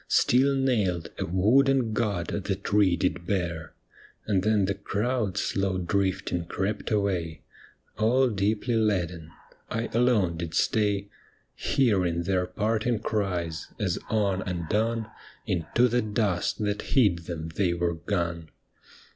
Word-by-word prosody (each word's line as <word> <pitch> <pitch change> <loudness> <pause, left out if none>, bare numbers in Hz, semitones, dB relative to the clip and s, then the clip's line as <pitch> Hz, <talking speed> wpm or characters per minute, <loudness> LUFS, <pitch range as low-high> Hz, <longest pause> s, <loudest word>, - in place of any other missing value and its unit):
Still 135 +3 +3
nailed, 105 -11 0
a - - -2
wooden 120 - +3
God 100 -7 -1 0.2
the 100 - 0
tree 100 -2 +2
did 85 -1 -1
bear. 85 -5 -2 0.5
And 100 -3 +1
then 105 -1 +2
the 100 - 0
crowd 105 +1 -2
slow 95 -1 0
drifting 90 -1 -1
crept 95 +5 -3
away, 95 -7 -1 0.6
All 125 +5 +4
deeply 105 +3 0
laden; 90 -7 0 0.4
I 115 +1 -2
alone 110 -8 +2
did 85 -1 -5
stay, 105 -2 +1 0.4
Hearing 90 -9 +1
their 90 0 0
parting 110 +5 0
cries, 90 -7 -2
as - - 0
on 100 -4 +1
and 85 -3 -4
on 115 +1 +1 0.4
Into 90 +8 +1
the 125 +1 +1
dust 105 -5 0
that 105 0 -1
hid 90 - +2
them 80 -2 -5
they 85 +1 0
were 85 0 0
gone. 85 0 -3
100 Hz, 130 wpm, -27 LUFS, 85-110 Hz, 0.6 s, All